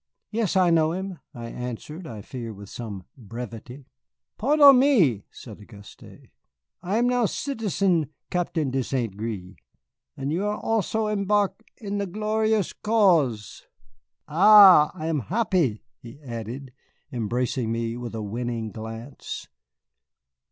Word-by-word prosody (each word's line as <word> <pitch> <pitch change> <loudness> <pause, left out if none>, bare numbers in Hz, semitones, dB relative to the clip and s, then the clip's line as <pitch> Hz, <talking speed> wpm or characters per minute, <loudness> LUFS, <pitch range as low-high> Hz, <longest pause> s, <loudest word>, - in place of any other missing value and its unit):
"Yes, 215 -4 -1
I 185 -2 +4
know 160 -1 +3
him," 190 -1 -5
I 120 -1 -8
answered, 125 +9 -7
I 110 -3 -8
fear 115 -3 -7
with 100 0 -11
some 105 -6 -7
brevity. 120 +3 -9 0.5
"Podden 280 +1 +6
me," 185 - +3
said 110 -4 -12
Auguste, 105 -1 -14 0.8
"I 190 +4 -1
am 240 +1 +2
now 245 -2 +2
Citizen 200 - -1 0.2
Captain 165 -5 -1
de 135 0 0
St. 120 -6 -2
Gré. 100 -4 -6 0.6
And 135 +2 -3
you 175 +5 -1
are 210 0 -1
also 220 0 -1
embark 205 0 0 0.2
in 205 -2 -4
the 200 - -2
glorious 215 +1 0
cause 170 - +1 0.6
Ah, 185 -1 +8
I 155 - -6
am 160 -2 0
happy," 180 - 0 0.2
he 120 +4 -12
added, 125 +1 -7 0.4
embracing 120 0 -2
me 115 0 -2
with 120 -2 -6
a 110 - -4
winning 115 +1 -4
glance. 115 +4 -8
145 Hz, 130 wpm, -25 LUFS, -, 0.8 s, Ah